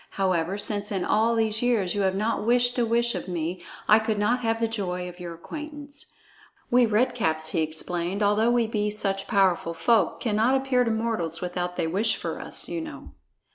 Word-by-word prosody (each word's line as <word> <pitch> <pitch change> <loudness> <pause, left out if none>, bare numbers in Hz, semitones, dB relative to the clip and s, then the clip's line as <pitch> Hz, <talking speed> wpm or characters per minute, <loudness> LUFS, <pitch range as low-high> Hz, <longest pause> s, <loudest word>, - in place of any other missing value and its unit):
However, 185 -1 0
since 205 0 -2
in 190 -3 -1
all 225 +2 +2
these 220 -1 +2
years 230 -7 +1
you 205 - -1
have 190 -1 +1
not 215 +2 -1
wished 245 +2 +3
a 235 - +2
wish 235 +1 +2
of - - -5
me, 175 0 -3 0.2
I 215 +1 +7
could 220 -1 -1
not 225 +5 +1
have 225 -2 -1
the 230 - +1
joy 180 -5 -3
of 175 0 -10
your 170 -1 -6
acquaintance. 295 - -8 0.6
We 245 -1 +5
Red 235 +4 +2
Caps," 160 -9 0
he 160 - 0
explained, 170 +5 -1
"although 210 +3 +3
we 240 -1 +3
be 210 -1 -1
such 195 -2 -2
powerful 180 -4 +2
folk, 215 +7 +2
cannot 225 +3 +2
appear 265 -2 +2
to 235 - -1
mortals 220 -8 -1
without 180 0 -3
they 170 - -1
wish 205 +7 +1
for - - -5
us, - - -3
you 335 - -3
know." 320 -1 -9
210 Hz, 200 wpm, -26 LUFS, 180-235 Hz, 0.6 s, I